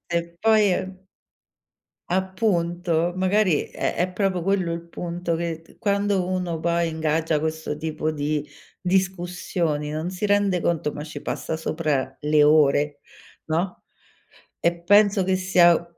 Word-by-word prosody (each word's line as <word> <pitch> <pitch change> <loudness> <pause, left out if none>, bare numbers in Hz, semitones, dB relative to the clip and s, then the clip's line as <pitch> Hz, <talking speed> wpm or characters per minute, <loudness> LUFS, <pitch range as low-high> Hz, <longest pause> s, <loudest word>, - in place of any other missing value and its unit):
E - - +4 0.2
poi 215 -4 +4 1.3
appunto, 175 -3 0
magari 185 -3 +2
è - - -2
è 180 +1 0
proprio 185 -1 0
quello 185 -3 +1
il 170 - -4
punto, 170 -1 -3
che 165 -1 -3
t 165 - -22
quando 200 -2 0
uno 180 -3 -2
poi 170 0 +1
ingaggia 160 0 0
questo 160 -1 -3
tipo 155 0 -2
di 150 0 -2 0.4
discussioni, 180 -4 -1
non 155 +3 -3
si 185 +3 -3
rende 205 -3 +2
conto, 165 -3 0
ma 150 - -6
ci 155 - -8
passa - - -3
sopra 155 -5 -2
le 150 0 +4
ore, 145 -1 +3 0.5
no, 170 +4 -2 0.8
e 170 0 +1
penso 205 +2 +5
che 185 0 +1
sia 175 -2 +4
170 Hz, 130 wpm, -24 LUFS, 155-185 Hz, 1.3 s, penso